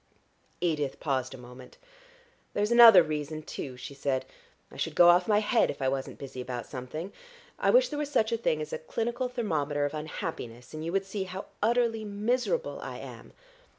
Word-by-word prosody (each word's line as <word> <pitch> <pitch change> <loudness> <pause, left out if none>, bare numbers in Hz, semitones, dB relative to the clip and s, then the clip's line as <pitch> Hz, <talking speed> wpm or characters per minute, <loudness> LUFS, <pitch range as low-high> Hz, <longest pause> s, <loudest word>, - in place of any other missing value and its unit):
Edith 150 -6 -1
paused 130 -2 -1
a - - -11
moment. 125 +1 -13 0.8
"There's 210 +2 +1
another 230 -6 +10
reason, 155 0 -4
too," 130 -4 -6
she 130 +2 -8
said. 135 -1 -1 0.5
"I - - -12
should - - -3
go 175 0 +8
off 175 +1 +5
my 210 -1 +4
head 225 +2 +2
if - - -5
I 135 -1 +1
wasn't 135 0 -4
busy 135 -2 -7
about 125 -1 -5
something. 150 +8 -6 0.5
I - - +2
wish - - +5
there 295 - -4
was 295 -1 -2
such 220 -5 +1
a 230 - +1
thing 155 -9 0
as - - -8
a - - -2
clinical 235 +8 -2
thermometer 150 - -1
of 145 - -3
unhappiness, 150 - -6
and 155 0 -5
you 165 - -3
would 195 +1 0
see 195 0 -4
how 185 +1 -6 0.2
utterly 230 0 +2
miserable 245 - -1
I - - -6
am. - - -10
165 Hz, 190 wpm, -29 LUFS, 140-220 Hz, 0.8 s, another